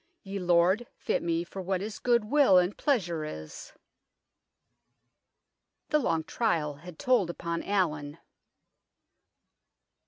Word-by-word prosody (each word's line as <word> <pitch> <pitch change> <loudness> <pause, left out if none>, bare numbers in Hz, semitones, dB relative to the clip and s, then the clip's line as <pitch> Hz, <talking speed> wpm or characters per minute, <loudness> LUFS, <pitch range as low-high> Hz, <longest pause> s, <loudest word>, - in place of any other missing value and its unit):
Ye 195 0 -5
Lord 180 +6 +3
fitt - - -1
mee 170 0 0
for 190 +2 -8
what 190 0 -1
his 210 +2 -6
good 240 -2 +2
will 265 -5 +5
and 180 +2 +2
pleasure 175 - 0
is." 80 - -8 2.2
The 300 - +3
long 165 - 0
trial 155 -9 -1
had 170 +2 -11
told 240 -9 +2
upon 170 -1 -3
Allin. 155 -7 -1
180 Hz, 115 wpm, -29 LUFS, 165-210 Hz, 2.2 s, will